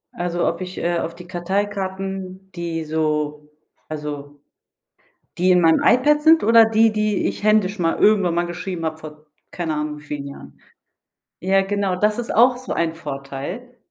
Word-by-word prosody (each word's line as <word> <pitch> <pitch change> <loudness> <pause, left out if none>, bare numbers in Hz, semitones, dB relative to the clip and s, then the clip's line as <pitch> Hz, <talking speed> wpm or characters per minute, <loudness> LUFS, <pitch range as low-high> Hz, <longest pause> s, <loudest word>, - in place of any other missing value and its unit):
Also, 175 0 -1
ob 170 +2 -2
ich, 185 0 -6
äh, 175 0 0
auf 165 0 -4
die 180 - -11
Karteikarten, 190 0 -4
die 170 -2 -4
so 150 -1 -2 0.4
also 145 -2 -6 1.0
die 185 +1 +3
in 180 - +5
meinem 165 -1 +4
iPad 295 +4 +4
sind? 320 +1 +5
Oder 230 +1 +7
die, 225 0 +3
die 215 -1 0
ich - - -5
händisch 210 -2 +2
ma 165 -1 +1
irgendwann 195 -5 +3
mal 175 0 +1
geschrieben 175 -1 -5
habe, 155 0 -3
vor 155 -1 -12 0.3
keine 165 -3 -3
Ahnung 150 0 -3
wie 150 - -16
vielen 145 -1 -6
Jahren? 70 - -12 0.8
Ja, 195 +1 +2
genau. 195 -1 -1
Das 210 +3 +1
ist 240 - -3
auch 245 +2 +5
so 255 - -5
ein 165 -1 -1
Vorteil. 145 - -7
180 Hz, 170 wpm, -21 LUFS, 155-205 Hz, 1.0 s, Oder